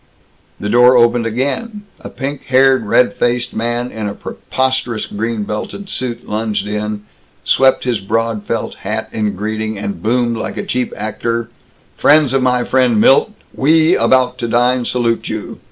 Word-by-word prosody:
The 105 - -4
door 125 +3 +5
opened 120 -1 +3
again. 140 - -3 0.2
A - - -9
pink 140 0 -5
haired, 130 -3 +3
red 125 +4 +3
faced 120 0 -1
man 120 +2 -2
in 110 -2 -4
a 100 - -7
preposterous 130 -4 -2
green 110 +1 -3
belted 105 - -5
suit 125 -2 -4
lunged 105 -2 -2
in, 105 0 -3 0.4
swept 135 0 +3
his 120 -4 0
broad 110 +2 -1
felt 115 - -3
hat 110 +2 -4
in 105 -2 -2
greeting, 110 +2 -3
and 100 0 -5
boomed 120 +1 0
like - - -5
a - - -3
cheap 125 0 -2
actor: 115 +2 -3 0.5
"Friends 145 -3 +4
of 135 - +2
my 125 -1 +2
friend 125 -4 +2
Milt, 135 - +5 0.2
we 160 +4 +3
about 130 -1 +2
to 120 - -2
dine 120 +1 +2
salute 115 -2 -1
you. 110 -1 -6
120 Hz, 160 wpm, -16 LUFS, 110-130 Hz, 0.5 s, door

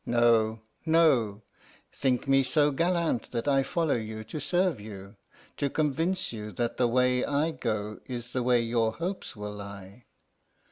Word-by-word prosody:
No, 115 -2 +3 0.2
no; 135 -11 +3 0.5
think 130 0 0
me 135 0 +5
so 145 +2 +3
gallant 165 -4 0
that 115 +2 -3
I 135 -1 +4
follow 155 +3 0
you 110 -1 -5
to 110 +8 -6
serve 175 - +1
you, 100 -1 -10 0.4
to 140 - 0
convince 160 +4 0
you 105 -1 -6
that 120 +5 -2
the 125 - +3
way 125 +1 +2
I 145 +3 +1
go 105 -7 -3
is 120 -2 -5
the 125 - -1
way 120 -1 +3
your 115 -1 +1
hopes 180 - -4
will 105 0 -6
lie. 100 +2 -10
125 Hz, 155 wpm, -28 LUFS, 110-145 Hz, 0.5 s, me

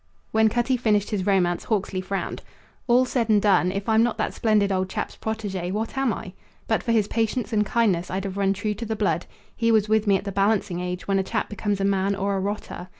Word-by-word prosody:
When 220 0 +4
Cutty 240 +3 +1
finished 210 -4 +1
his 200 -2 -1
romance 180 -3 +2
Hawksley 195 -3 -1
frowned. 195 +1 -4 0.5
"All 250 +1 +5
said 240 -3 -1
and 210 -1 +5
done, 190 -3 +3
if 195 +1 -4
I'm 220 0 +4
not 235 0 +1
that - - -1
splendid 210 -3 +2
old 185 0 0
chap's - - -4
protege, 205 -5 -4
what 215 +6 -3
am 270 -3 +1
I? 185 -2 -6 0.3
But 220 - +1
for 235 - -1
his 215 -3 +2
patience 225 0 -1
and 210 -1 +3
kindness 200 -5 +1
I'd 190 +1 -2
have 195 -1 -4
run 195 -1 +2
true 210 +2 -2
to 225 +3 -6
the 220 - -2
blood. 180 -6 0 0.3
He 230 -1 +2
was 215 -2 +3
with 215 0 +2
me 200 -1 +5
at - - -7
the 200 - -4
balancing 200 -2 +1
age, 180 0 -4
when 195 -1 +2
a - - +1
chap 220 +3 -2
becomes 205 -1 -2
a 195 - +1
man 195 0 +1
or 200 +1 -1
a - - 0
rotter. 200 -2 -4
205 Hz, 240 wpm, -24 LUFS, 195-220 Hz, 0.5 s, All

